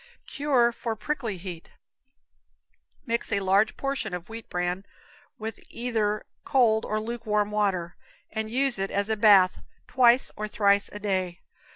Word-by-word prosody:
Cure 265 -5 +2
for 230 -1 -4
Prickly 230 -4 -3
Heat. 175 -2 -9 1.3
Mix 235 -2 -2
a 200 - +2
large 195 +3 +2
portion 275 -9 -2
of 180 +2 -8
wheat 225 0 -9
bran 180 +1 -2 0.5
with 220 0 -6
either 220 -3 -1 0.2
cold 225 -4 +3
or 215 - -1
lukewarm 215 -2 -1
water, 190 -5 0 0.4
and 220 0 -3
use 260 -1 0
it 195 0 -1
as 200 +2 -1
a 220 - +2
bath 200 -4 +5 0.3
twice 245 0 +4
or 215 0 -4
thrice 200 -1 +2
a - - -7
day. 185 -3 -2
215 Hz, 145 wpm, -26 LUFS, 195-235 Hz, 1.3 s, bath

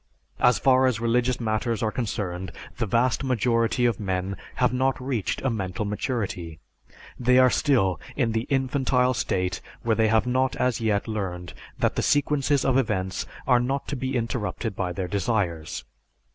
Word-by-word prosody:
As 125 0 +4
far 130 -1 +4
as 120 -4 0
religious 120 +2 +1
matters 115 0 -1
are 110 - +1
concerned, 95 -6 -3 0.3
the 115 - -1
vast 120 +6 +1
majority 120 -1 +1
of 120 -4 +1
men 95 -1 -2 0.2
have 125 -1 +2
not 130 +1 +1
reached 125 -6 -2
a 135 - +1
mental 95 -2 -3
maturity; 100 - -3 0.6
they 125 +1 +4
are 130 -1 +6
still 120 - +2 0.2
in 120 -5 +1
the 110 +2 -2
infantile 130 -1 +2
state 90 -6 -1 0.2
where 115 -1 +2
they 110 0 +3
have 110 0 +3
not 130 +1 +1
as 125 -2 0
yet 105 -2 0
learned 90 -6 -4 0.2
that - - 0
the - - +2
sequences 145 -1 +2
of 130 0 +3
events 95 -6 -2 0.2
are 125 -2 +4
not 135 +3 -2
to 145 - -2
be 130 +1 -3
interrupted 115 -2 -2
by 90 -1 -2
their 90 +1 -3
desires. 95 -6 -1
115 Hz, 165 wpm, -25 LUFS, 100-130 Hz, 0.6 s, are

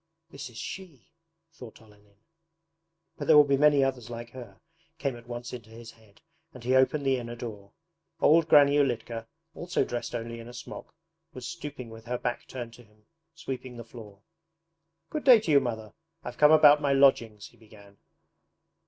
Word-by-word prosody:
'This 140 -1 -8
is 115 - -14
SHE,' 170 - -8 0.5
thought 125 -8 -12
Olenin. 105 -2 -22 1.0
'But - - -5
there 155 - +7
will 150 - +9
be 140 -1 +1
many 145 0 +4
others 130 -3 -2
like 120 0 -8
her' 125 -2 -11 0.4
came 140 -5 -2
at 120 0 -14
once 120 +1 -7
into 115 -3 -9
his 115 +1 -11
head, 110 -3 -24 0.3
and 125 - -11
he 125 +2 0
opened 130 +2 +2
the 135 -1 +2
inner 120 -1 -6
door. 105 -4 -9 0.5
Old 160 +1 +4
Granny 145 -1 +6
Ulitka, 120 -4 -2 0.3
also 175 +1 -2
dressed 120 0 -5
only 115 0 -5
in 115 - -10
a 120 - -11
smock, - - -10 0.4
was 125 -1 -8
stooping 145 -8 -8
with 115 0 -12
her 125 +1 -3
back 120 0 -4
turned 120 -3 -7
to 120 - -15
him, 105 -1 -28 0.3
sweeping 130 -5 -7
the 115 - -7
floor. 105 -4 -13 0.9
'Good 305 - -3
day 250 -4 +8
to 190 -7 -3
you. 140 - +7
Mother! 110 -5 -5 0.3
I've - - -8
come 150 0 +6
about 150 -1 +7
my 140 -1 +1
lodgings,' 115 -6 +2
he 120 - -25
began. 105 -3 -18
120 Hz, 180 wpm, -27 LUFS, 115-140 Hz, 1.0 s, will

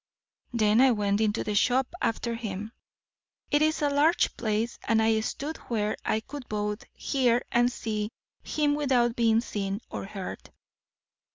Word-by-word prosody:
Then 220 -1 +3
I 265 - +7
went 205 -3 +1
into 215 0 +1
the 210 - -2
shop 250 +7 +2
after 235 +1 0
him. 215 -2 -5 0.8
It 290 0 +4
is 310 0 +2
a 290 - +3
large 300 +5 +3
place, 220 +1 -1
and 225 -1 +3
I 220 0 +3
stood 285 +8 -4
where 215 -3 0
I 220 - 0
could 275 +2 -9
both 210 +4 -2
hear 245 -3 +1
and 240 +1 +3
see 215 -3 -3 0.3
him 295 -1 +1
without 255 -5 +2
being 225 -1 +3
seen 200 -4 -3
or - - -4
heard. 195 -1 -7
230 Hz, 155 wpm, -28 LUFS, 210-260 Hz, 0.8 s, I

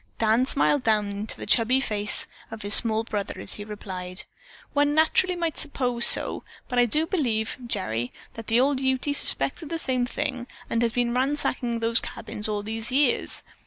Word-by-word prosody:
Dan 225 +3 +2
smiled 285 0 +2
down 215 -3 +1
into 205 +2 -3
the - - -7
chubby 245 +2 +3
freckled 270 - -3
face 205 +1 +2 0.2
of 225 -2 -8
his 205 0 +1
small 220 0 +6
brother 205 -3 -4
as - - -1
he 205 - -6
replied: 190 -3 -6 0.5
"One 290 0 +2
naturally 340 +3 +3
might 335 -2 -3
suppose 250 -5 0
so, - - +1 0.2
but 250 -2 0
I 240 - +4
do 305 +8 +2
believe, 240 - -1
Gerry, 120 - -2 0.2
that 225 -1 -9
the 230 +2 +3
old 270 +1 +2
Ute 265 +2 0
suspected 290 +2 +3
the 330 - -2
same 255 -5 -1
thing 255 -3 -3 0.2
and 230 - +1
has 230 -1 +1
been 240 -1 0
ransacking 255 -3 -1
those 230 0 +2
cabins 215 -2 -4
all 205 -1 -2
these 225 +2 -3
years. 270 -1 +1
235 Hz, 185 wpm, -25 LUFS, 220-275 Hz, 0.5 s, small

